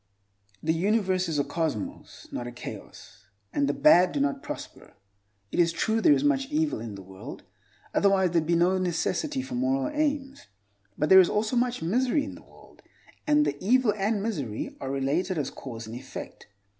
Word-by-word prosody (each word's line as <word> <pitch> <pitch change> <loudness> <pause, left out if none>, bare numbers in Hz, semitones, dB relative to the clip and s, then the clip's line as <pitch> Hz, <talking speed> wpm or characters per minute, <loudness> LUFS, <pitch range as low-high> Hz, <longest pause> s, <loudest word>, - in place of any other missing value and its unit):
The 160 - +2
universe 185 0 +1
is 155 - -1
a 145 - +2
cosmos, 155 - -4
not 120 - -4
a - - -6
chaos, 105 -4 -10 0.3
and 285 -1 +1
the - - +1
bad 185 - +5
do 290 - -1
not 285 -1 0
prosper. 295 - -9 0.6
It - - -2
is 170 -1 +4
true 220 +6 0
there 310 - +5
is - - -1
much 275 -2 +2
evil 310 0 0
in 110 -3 -6
the 95 - -9
world, 95 0 -10 0.5
otherwise 195 -3 +3
there 170 -1 +3
would 155 - -7
be 170 - +3
no 180 +3 +3
necessity 260 - -1
for 265 - -8
moral 270 +3 0
aims, 285 -2 -1 0.5
but 150 - 0
there 190 - +10
is 180 - +5
also 215 +3 0
much 245 -6 0
misery 250 - +1
in 285 - -6
the - - -12
world, - - -19 0.5
and 300 0 +4
the - - -3
evil 240 +1 +3
and 205 0 0
misery 145 - -3
are 135 - -4
related 145 +7 -1
as 140 -3 -2
cause 115 -4 -8
and 110 +1 -8
effect. 130 +1 -9
190 Hz, 190 wpm, -27 LUFS, -, 0.6 s, there